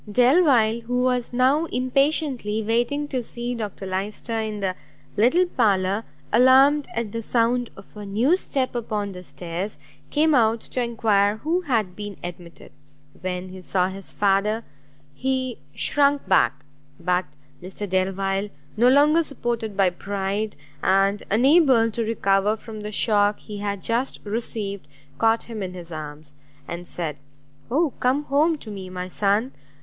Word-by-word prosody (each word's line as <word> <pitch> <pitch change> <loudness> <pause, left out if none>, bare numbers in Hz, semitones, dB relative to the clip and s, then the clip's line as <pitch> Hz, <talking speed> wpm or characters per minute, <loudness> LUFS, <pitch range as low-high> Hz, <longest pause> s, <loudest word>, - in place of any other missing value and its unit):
Delvile, 245 - +4
who 250 +1 +1
was 250 -1 0
now 260 +6 +3
impatiently 255 -5 0
waiting 240 +7 0
to 260 -3 -1
see 240 +1 -4
Dr 210 -4 -5
Lyster 195 +5 -4
in 215 -1 -3
the 190 -2 -1 0.4
little 255 - +4
parlour, 205 - +1 0.3
alarmed 265 +5 +6
at 230 -2 -2
the 230 - -3
sound 235 +1 +1
of 195 - -15
a 210 - -7
new 225 - +2
step 270 -8 -1
upon 215 -4 -3
the 180 -1 -9
stairs, 180 +3 -5 0.3
came 310 +1 +3
out 230 -3 +3
to 255 - -4
enquire 215 -3 +2
who 330 +9 0
had 215 -8 0
been 205 -1 -7
admitted. 175 -1 -9 0.5
When 185 0 -4
he 185 0 -10
saw 185 0 0
his 195 0 -6
father, 205 +3 +1 0.5
he 260 -2 -2 0.2
shrunk 285 0 +2
back; - - +2 0.3
but 180 +1 +1 0.4
Mr 190 +3 -6
Delvile, 195 +2 0 0.3
no 240 +3 +5
longer 295 +5 +5
supported 235 -8 -3
by 190 -2 +4
pride, 200 +3 -3 0.3
and 195 +2 +2
unable 255 - +5
to 230 - -3
recover 210 -1 +1
from 220 0 -9
the 210 0 -5
shock 205 -1 +2
he 210 -2 -9
had 200 -2 -3
just 240 +4 -1
received, 205 -2 -3 0.3
caught 225 0 +3
him 225 -3 -7
in 185 -1 -5
his 175 -1 -9
arms, 150 -1 -7 0.3
and 170 +1 -6
said 160 -5 -4 0.5
"Oh 300 +4 +2
come 260 +4 +1
home 300 +3 +2
to 220 -7 -10
me, 190 -2 -7
my 180 0 -5
son! 205 +6 +1
220 Hz, 150 wpm, -23 LUFS, 195-250 Hz, 0.5 s, alarmed